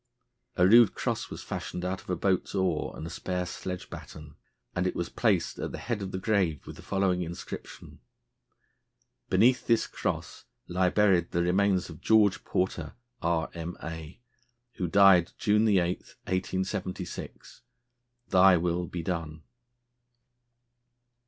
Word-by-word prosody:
A 90 - +5
rude 115 +1 +7
cross - - -2
was - - -7
fashioned 90 - -5
out 95 +1 -2
of - - -17
a 90 - +1
boat's 95 +2 0
oar 90 -5 -1
and - - -6
a - - -5
spare 90 +1 -3
sledge 90 +1 -6
batten, 75 -2 -10 0.4
and 90 +1 +1
it - - -2
was 85 - -2
placed - - 0
at - - -3
the - - -6
head 115 -3 -3
of 95 -1 -4
the 95 - -3
grave 95 - 0
with - - -9
the - - -11
following 95 -2 0
inscription: 85 0 -8 1.3
"Beneath 120 +7 +3
this 115 -1 +3
cross - - -4 0.2
lie 90 +1 +2
buried 95 -4 +3
the 85 - 0
remains 95 +1 +2
of 80 -3 -11
GEORGE 105 -2 +4
PORTER, 90 -4 -2 0.3
R.M.A., 80 0 -4 0.6
who 90 - -1
died 95 -1 +5
June 105 +1 +3
8, 100 -2 +4 0.2
1876. 95 0 -5 0.7
'Thy 95 -1 +6
will 85 +1 -1
be 85 -2 -5
done!'" 80 -3 -4
90 Hz, 140 wpm, -28 LUFS, 85-95 Hz, 1.3 s, rude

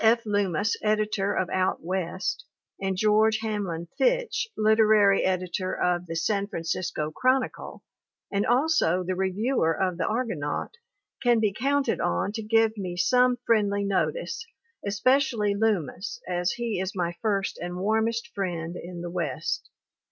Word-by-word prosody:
F. 230 +1 +4
Lummis, 205 -1 +1
editor 210 -2 +1
of 185 - 0
Out 185 -2 0
West, 185 +1 -2 0.4
and 195 -1 -1
George 215 +2 +4
Hamlin 195 -6 -3
Fitch, - - +1
literary 215 -2 +5
editor 185 0 -1
of 180 0 0
The 165 - -5
San 200 +4 0
Fransisco 165 -3 -3
Chronicle, 255 +5 0 0.5
and 200 0 +1
also 240 - +2
the 185 +1 -2
reviewer 190 +1 +1
of 185 -2 0
the - - 0
Argonaut 215 - -2 0.5
can 240 -3 +4
be 210 -3 +1
counted 275 +2 0
on 85 - 0
to 220 +1 -4
give 225 0 +2
me 180 -2 -4
some 250 +5 +3
friendly 205 -3 +2
notice, 175 - -1 0.4
especially 220 0 +2
Lummis 215 - -1
as 180 0 0
he 235 -5 -2
is 190 +2 -3
my 175 -2 -1
first 200 -3 -1
and 175 +1 -5
warmest 220 +4 0
friend 175 -3 -3
in 175 0 -7
the 175 0 -5
west. - - -3
200 Hz, 140 wpm, -26 LUFS, 180-225 Hz, 0.5 s, literary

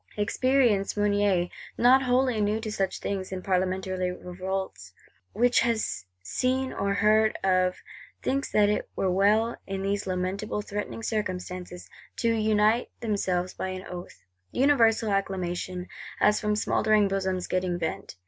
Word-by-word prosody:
Experienced 225 -2 +2
Mounier, 205 -3 +2 0.3
not 255 +3 +6
wholly 250 -3 +2
new 210 +1 +1
to 220 -1 -5
such 195 -2 -1
things, 190 -2 -4
in 185 -1 -5
Parlementary 185 -1 0
revolts, 190 +2 -5 0.4
which 245 +1 +3
he 235 - +2
has 225 - -1 0.2
seen 260 - -1
or 200 0 -1
heard 215 +1 +3
of, 185 -1 +2 0.5
thinks 275 +1 -1
that 210 -1 +4
it 210 - -1
were 190 - 0
well, 210 +5 +3
in 195 0 -3
these 200 0 -1
lamentable 190 +3 -2
threatening 210 +2 -5
circumstances, 180 -4 -4 0.3
to 230 - 0
unite 215 +1 +2
themselves 185 -5 -1
by - - -4
an 185 0 -5
Oath.—Universal 210 - 0
acclamation, 185 -2 -2 0.3
as 210 0 +4
from 210 -1 0
smouldering 215 0 +2
bosoms 190 -2 -1
getting 180 -1 -1
vent! 160 - -4
200 Hz, 135 wpm, -27 LUFS, 185-220 Hz, 0.5 s, not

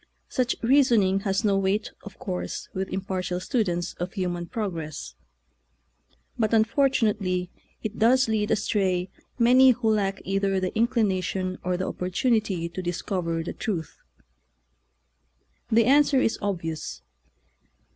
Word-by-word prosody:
Such 250 -2 0
reasoning 230 -7 +4
has 195 +1 -1
no 200 -1 +3
weight, 195 +2 0
of 205 - -11
course, 180 -2 -5
with 190 0 -3
impartial 185 -1 -3
students 180 -5 -1
of 175 +1 -4
human 175 -3 -3
prog 210 -1 -3
ress, 155 - -6 1.3
but 220 0 +2
unfortunately 215 -6 +1 0.3
it 220 0 -5
does 255 +4 +4
lead 215 -1 0
astray 190 -4 0 0.3
many 255 +2 +6
who 235 -3 +2
lack 195 -2 0
either 195 0 +1
the 185 -1 -2
inclina 220 -4 +1
tion 185 0 -3
or 180 0 0
the 185 - -2
opportunity 185 -1 0
to 170 +2 -6
discover 175 -1 -2
the 170 - -5
truth. 180 -9 -4 1.7
The 225 0 +5
answer 280 +1 +5
is 225 - 0
obvious. 165 - -4
195 Hz, 125 wpm, -26 LUFS, 180-225 Hz, 1.7 s, many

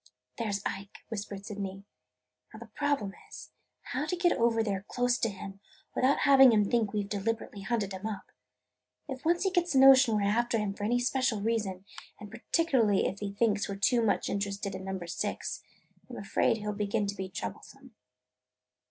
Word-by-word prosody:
"There 225 -3 -1
's 200 0 -2
Ike!" 195 +1 -6
whispered 200 -2 -6
Sydney. 195 -2 -6 0.7
"Now, - - -11
the - - -9
problem 285 -9 -1 0.2
is, - - -10 0.3
how 265 +5 -3
to 360 - -1
get 350 0 +2
over 230 -1 +2
there 200 -3 -2
close 245 0 +1
to 230 - +1
him 195 0 -9 0.3
without 265 +2 +2
having 270 -3 +7
him 210 -2 +3
think 225 -4 +2
we 210 -1 -1
've - - -9
deliberately 210 0 -3
hunted 200 -1 -1
him 190 +3 -5
up. 215 -3 -7 0.8
If 265 -2 -5
he 300 - -5
once 345 +3 +2
gets 350 -3 +1
the - - +3
notion 265 -4 +7
we 205 - 0
're - - +1
after 235 +3 +1
him 210 -2 -1
for 205 +1 -5
any 240 +3 +2
special 245 -3 0
reason, 205 -4 -2 0.3
and 210 -1 -10
particularly 235 - +1
if 200 - -2
he 205 -1 -4
thinks 205 0 0
we 200 - -3
're - - -9
too 235 +4 +3
much 220 -3 +1
interested 200 0 -3
in 190 - -6
Number 190 -2 -4
Six, 170 - -3 0.5
I - - -10
'm - - -7
afraid - - +1
he 210 -1 -7
'll 210 - -1
begin 210 +1 -1
to 200 - -2
be 190 -2 -5
troublesome." 180 - -8
215 Hz, 200 wpm, -30 LUFS, 200-245 Hz, 0.8 s, having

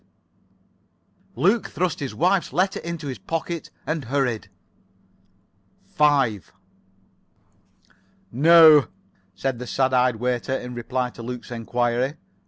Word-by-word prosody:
Luke 205 +6 +2
thrust 180 -4 -2
his 135 -2 -5
wife's 180 +1 +1
letter 185 +7 0
into 170 -2 -6
his 130 -6 -5
pocket, 165 - -4 0.2
and 155 -4 -3
hurried. 125 -6 -1 1.4
5 135 - +2 1.8
"No," 155 +2 +7 0.5
said 135 -3 -3
the 125 - -7
sad 130 +1 0
eyed 125 -1 +3
waiter, 125 +3 -2
in 125 0 -8
reply 125 +1 -3
to 120 - -11
Luke's 125 +1 -7
enquiry. 120 +3 -1
130 Hz, 105 wpm, -23 LUFS, 125-160 Hz, 1.8 s, No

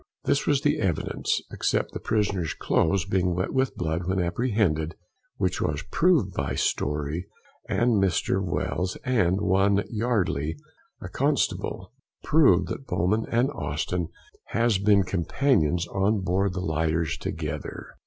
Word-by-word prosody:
This 140 - +1
was 140 -2 +3
the 150 +1 +1
evidence, 90 -7 -1
except - - 0
the - - -4
prisoner's 100 -7 -1
cloaths 85 +1 +1
being 90 -2 +1
wet 90 +1 -2
with 130 -1 +1
blood 85 +1 -2
when 95 0 0
apprehended, 85 -5 0 0.4
which - - -1
was 75 +2 -1
proved 155 - +3
by - - -2
Story 75 +4 -1 0.4
and 110 0 +2
Mr. 95 0 +1
Wells, 90 +1 -2
and 100 -8 +2
one 100 0 +2
Yardly, 105 - 0 0.5
a - - -6
constable, - - -1 0.3
proved 135 - +4
that 135 - -6
Bowman 105 +6 0
and 120 +4 +2
Austin 85 - -2 0.4
has 115 -4 +1
been 100 -1 +4
companions 90 - +1
on 100 +2 +1
board 95 +1 0
the 95 - -3
lighters 80 -1 0
together. 75 -2 -5
95 Hz, 135 wpm, -26 LUFS, 85-110 Hz, 0.5 s, proved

